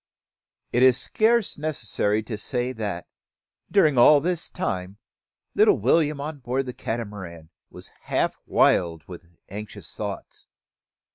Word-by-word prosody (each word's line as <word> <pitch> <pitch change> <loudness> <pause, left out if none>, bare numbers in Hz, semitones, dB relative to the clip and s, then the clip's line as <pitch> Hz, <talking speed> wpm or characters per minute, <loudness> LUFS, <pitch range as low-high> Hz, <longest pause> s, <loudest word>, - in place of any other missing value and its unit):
It 120 - +2
is 130 -1 +6
scarce 225 -5 +1
necessary 110 -8 -1
to 110 0 -5
say 125 +4 -2
that, 100 -7 -4 0.6
during 155 -10 +4
all 145 +5 +7
this 175 +2 -2
time. 95 - -4 0.6
Little - - +5
William, 145 +6 +2
on 145 +1 -5
board 130 +2 -2
the 125 - -6
Catamaran, 100 -10 -6 0.2
was - - -10
half - - 0
wild 85 -2 +2
with 90 -2 -11 0.2
anxious 105 +2 -8
thoughts. - - -7
120 Hz, 125 wpm, -24 LUFS, 100-150 Hz, 0.6 s, all